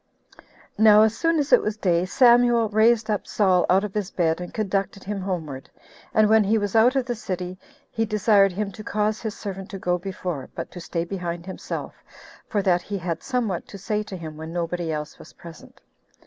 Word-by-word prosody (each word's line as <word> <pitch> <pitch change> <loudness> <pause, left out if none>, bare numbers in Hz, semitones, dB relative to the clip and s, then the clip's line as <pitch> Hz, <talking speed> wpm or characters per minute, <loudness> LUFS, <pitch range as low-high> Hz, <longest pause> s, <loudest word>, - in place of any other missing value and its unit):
2. 220 - +1
Now 215 -1 +8
as 220 0 +2
soon 330 +5 +1
as 290 -1 0
it - - +7
was 210 0 -3
day, 175 -4 +1
Samuel 240 +2 +4
raised 220 +1 +3
up 210 -2 -2
Saul 185 -4 +2
out 190 +2 +4
of 210 -2 -5
his 205 -3 -2
bed, 165 -1 0
and 180 - -6
conducted 200 -1 -2
him 200 0 -4
homeward; 160 -8 -5 0.4
and 215 0 +4
when 220 0 +5
he 215 +3 +2
was 205 0 -2
out 240 +4 +5
of 265 -2 +1
the 245 - -2
city, 185 -5 -5 0.4
he 225 - -1
desired 210 -2 +3
him 200 +1 -3
to 215 +3 -10
cause 210 +1 -1
his 220 -3 -5
servant 195 -1 -6
to 195 - -6
go 180 -1 -1
before, 180 -6 -5
but - - -6
to 175 - -9
stay 170 0 -3
behind 175 -2 -5
himself, 190 - -6 0.6
for 205 -2 0
that 180 -2 +2
he 200 +2 -5
had 170 -2 -4
somewhat 235 -9 -2
to 200 - -9
say 210 +2 -2
to 205 -3 -7
him 160 -3 -8
when 160 +1 -7
nobody 170 -1 -2
else 150 0 -5
was - - -14
present. 170 -2 -14
195 Hz, 210 wpm, -24 LUFS, 180-215 Hz, 0.6 s, Now